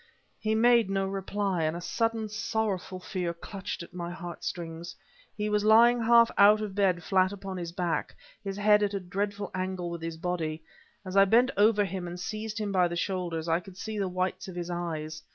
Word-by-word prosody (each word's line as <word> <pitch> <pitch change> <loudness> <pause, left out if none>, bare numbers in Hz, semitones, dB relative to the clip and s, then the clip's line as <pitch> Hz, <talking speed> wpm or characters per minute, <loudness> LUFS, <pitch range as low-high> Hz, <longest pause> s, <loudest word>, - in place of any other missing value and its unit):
He 215 0 0
made 235 -2 +4
no 195 0 0
reply, 195 -1 -2
and 155 +1 0
a - - -5
sudden, 225 +5 -1
sorrowful 210 -3 -2
fear 180 -2 -3
clutched 190 0 -6
at 170 - -14
my 175 -1 -5
heart 175 -1 -8
strings. 170 0 -5 0.4
He 210 0 -1
was 210 0 +1
lying 235 +3 +6
half 235 0 +6
out 210 +1 +7
of 210 -2 -4
bed 190 -4 +1
flat 185 +1 +2
upon 195 -1 -6
his 170 -1 -5
back, 175 -2 -2 0.3
his 195 -1 -4
head 210 0 +5
at 205 -1 0
a - - -1
dreadful 200 +2 -3
angle 185 -2 -3
with 170 -1 -6
his 165 0 -5
body. 165 -2 -3 0.4
As 185 +1 -6
I 195 0 +7
bent 240 +6 +4
over 205 0 +4
him 185 -2 -4
and 175 +1 -7
seized 215 +3 -4
him 210 -2 -2
by 180 -2 +3
the 170 - -4
shoulders, 170 -3 -2
I 165 +1 +2
could 180 +1 -13
see 215 +1 -4
the 195 -2 0
whites 185 +1 -2
of 185 - -8
his 175 0 -4
eyes. 160 -3 -4
190 Hz, 205 wpm, -28 LUFS, 175-210 Hz, 0.4 s, out